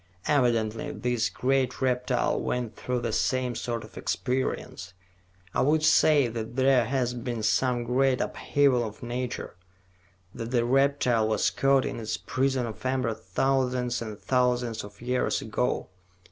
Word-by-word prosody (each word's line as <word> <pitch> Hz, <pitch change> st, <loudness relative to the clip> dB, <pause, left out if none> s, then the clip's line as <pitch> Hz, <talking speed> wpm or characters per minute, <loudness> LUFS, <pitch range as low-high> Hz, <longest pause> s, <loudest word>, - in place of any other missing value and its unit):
Evidently 115 Hz, -6 st, +1 dB
this 120 Hz, -2 st, -1 dB
great 130 Hz, 0 st, 0 dB
reptile 125 Hz, -1 st, +1 dB
went 120 Hz, -3 st, -2 dB
through 125 Hz, -1 st, -2 dB
the 115 Hz, -2 st, -3 dB
same 125 Hz, +2 st, 0 dB
sort 115 Hz, 0 st, -3 dB
of 110 Hz, -, -10 dB
experience. 125 Hz, -7 st, -2 dB, 0.6 s
I -, -, +1 dB
would 155 Hz, +3 st, +2 dB
say 150 Hz, -3 st, +5 dB
that 115 Hz, 0 st, -5 dB
there 130 Hz, -2 st, +4 dB
has 125 Hz, 0 st, 0 dB
been 120 Hz, -2 st, -4 dB
some 125 Hz, +2 st, +1 dB
great 130 Hz, +2 st, +2 dB
upheaval 140 Hz, -4 st, +1 dB
of 110 Hz, +2 st, -7 dB
nature, 120 Hz, -3 st, -4 dB, 0.8 s
that 115 Hz, -, -5 dB
the 120 Hz, -1 st, +1 dB
reptile 130 Hz, -3 st, +2 dB
was 110 Hz, -2 st, +1 dB
caught 135 Hz, -1 st, +3 dB
in -, -, -4 dB
its 110 Hz, -1 st, -3 dB
prison 130 Hz, -1 st, 0 dB
of 110 Hz, -2 st, -8 dB
amber 130 Hz, -3 st, 0 dB
thousands 125 Hz, +4 st, 0 dB
and 110 Hz, -2 st, -6 dB
thousands 125 Hz, -3 st, 0 dB
of 105 Hz, +2 st, -12 dB
years 125 Hz, +1 st, 0 dB
ago. 110 Hz, +3 st, -1 dB
125 Hz, 145 wpm, -27 LUFS, 115-130 Hz, 0.8 s, say